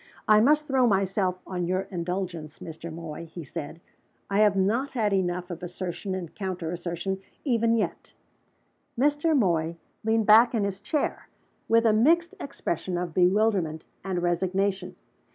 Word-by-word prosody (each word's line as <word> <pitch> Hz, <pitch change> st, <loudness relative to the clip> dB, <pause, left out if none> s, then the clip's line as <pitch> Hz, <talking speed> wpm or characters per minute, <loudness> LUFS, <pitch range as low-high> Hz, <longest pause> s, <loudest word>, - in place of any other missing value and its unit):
"I 215 Hz, 0 st, +6 dB
must 300 Hz, +5 st, +4 dB
throw 265 Hz, -3 st, +3 dB
myself 190 Hz, -2 st, +1 dB
on 180 Hz, -2 st, -3 dB
your 185 Hz, +1 st, +1 dB
indulgence, 175 Hz, -3 st, -4 dB
Mr. 165 Hz, +1 st, -8 dB
Moy," 165 Hz, 0 st, -7 dB
he 165 Hz, +1 st, -8 dB
said. 145 Hz, +3 st, -7 dB, 0.5 s
"I 200 Hz, -, +2 dB
have 210 Hz, -2 st, +5 dB
not 220 Hz, +8 st, +1 dB
had 215 Hz, -5 st, +1 dB
enough 180 Hz, -1 st, -1 dB
of 175 Hz, -, -6 dB
assertion 180 Hz, +2 st, -4 dB
and 175 Hz, -4 st, -6 dB
counter 185 Hz, -4 st, -4 dB
assertion, 175 Hz, +2 st, -3 dB, 0.3 s
even 230 Hz, -3 st, +2 dB
yet." 220 Hz, -, -3 dB, 0.8 s
Mr. 295 Hz, +3 st, +3 dB
Moy 170 Hz, -7 st, +1 dB, 0.3 s
leaned 220 Hz, 0 st, +2 dB
back 230 Hz, +3 st, +7 dB
in 215 Hz, -, +1 dB
his 200 Hz, -1 st, -2 dB
chair, 275 Hz, +9 st, -2 dB, 0.4 s
with 230 Hz, +1 st, +4 dB
a 220 Hz, -, +5 dB
mixed 330 Hz, +10 st, +3 dB
expression 180 Hz, -, -3 dB
of 175 Hz, -2 st, -3 dB
bewilderment 180 Hz, -3 st, +2 dB, 0.2 s
and 180 Hz, -2 st, -2 dB
resignation. 185 Hz, +2 st, 0 dB
190 Hz, 150 wpm, -27 LUFS, 175-220 Hz, 0.8 s, back